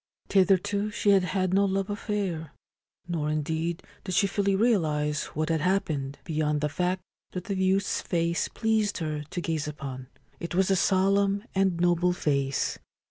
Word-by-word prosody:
Thitherto 200 Hz, +2 st, +3 dB
she 210 Hz, -1 st, +2 dB
had 195 Hz, -2 st, +4 dB
had 185 Hz, 0 st, 0 dB
no 200 Hz, +1 st, +4 dB
love 195 Hz, 0 st, 0 dB
affair; 200 Hz, -6 st, -3 dB, 0.5 s
nor, 160 Hz, -4 st, -1 dB
indeed, 160 Hz, +3 st, -2 dB, 0.2 s
did 185 Hz, -2 st, -3 dB
she -, -, +4 dB
fully 200 Hz, 0 st, +1 dB
realise 155 Hz, -9 st, +1 dB
what 155 Hz, +1 st, -1 dB
had 160 Hz, -2 st, +1 dB
happened, 155 Hz, -7 st, 0 dB
beyond 150 Hz, -2 st, 0 dB
the 150 Hz, -, +1 dB
fact 180 Hz, +4 st, -1 dB, 0.3 s
that 180 Hz, -, -4 dB
the 200 Hz, -, -3 dB
youth's 190 Hz, +1 st, +1 dB
face 170 Hz, -1 st, 0 dB
pleased 220 Hz, -2 st, 0 dB
her 155 Hz, -3 st, -2 dB
to 175 Hz, -, -3 dB
gaze 160 Hz, -3 st, -2 dB
upon. 135 Hz, -4 st, -6 dB, 0.3 s
It 170 Hz, 0 st, -5 dB
was 190 Hz, +1 st, +3 dB
a -, -, +5 dB
solemn 195 Hz, +2 st, +2 dB
and 190 Hz, -3 st, +1 dB
noble 175 Hz, 0 st, +3 dB
face. 140 Hz, -5 st, 0 dB
180 Hz, 160 wpm, -27 LUFS, 155-195 Hz, 0.5 s, a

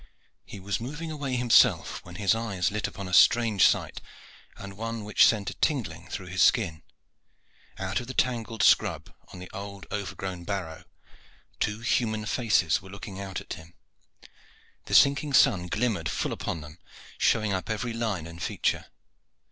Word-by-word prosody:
He -, -, -9 dB
was 100 Hz, +3 st, -3 dB
moving 150 Hz, +6 st, -5 dB
away 140 Hz, -4 st, -3 dB
himself, 125 Hz, -1 st, +3 dB
when 90 Hz, 0 st, -12 dB
his 100 Hz, +3 st, +2 dB
eyes 100 Hz, -6 st, -1 dB
lit 105 Hz, 0 st, -2 dB
upon 100 Hz, -, -7 dB
a 90 Hz, -, -7 dB
strange 115 Hz, -1 st, +6 dB
sight, -, -, -1 dB, 0.6 s
and 100 Hz, 0 st, -9 dB
one 115 Hz, +1 st, -4 dB
which 105 Hz, 0 st, +5 dB
sent 105 Hz, -3 st, 0 dB
a -, -, -8 dB
tingling 90 Hz, -, -2 dB
through 95 Hz, -, -6 dB
his 90 Hz, +1 st, -2 dB
skin. 85 Hz, -10 st, +3 dB, 1.0 s
Out 95 Hz, +2 st, -2 dB
of 120 Hz, -, -8 dB
the 130 Hz, -, -7 dB
tangled 115 Hz, -3 st, 0 dB
scrub -, -, +3 dB
on -, -, -12 dB
the 90 Hz, 0 st, -9 dB
old 100 Hz, 0 st, -7 dB
overgrown 95 Hz, -3 st, -5 dB
barrow 90 Hz, -4 st, -5 dB, 0.7 s
two 105 Hz, +1 st, -1 dB
human 110 Hz, -3 st, 0 dB
faces 105 Hz, -9 st, +2 dB
were 95 Hz, -, -13 dB
looking 100 Hz, 0 st, -8 dB
out 95 Hz, -1 st, -5 dB
at -, -, -7 dB
him; 80 Hz, +1 st, -12 dB, 1.1 s
the -, -, -1 dB
sinking 140 Hz, +1 st, +4 dB
sun 100 Hz, -11 st, +4 dB
glimmered 105 Hz, -6 st, -1 dB
full -, -, -2 dB
upon 80 Hz, -, -4 dB
them, 75 Hz, +3 st, -12 dB, 0.4 s
showing 110 Hz, -3 st, +2 dB
up 95 Hz, +2 st, -3 dB
every 115 Hz, +2 st, -2 dB
line 110 Hz, -8 st, -2 dB
and 85 Hz, +1 st, -10 dB
feature. -, -, -1 dB
100 Hz, 165 wpm, -27 LUFS, 90-115 Hz, 1.1 s, strange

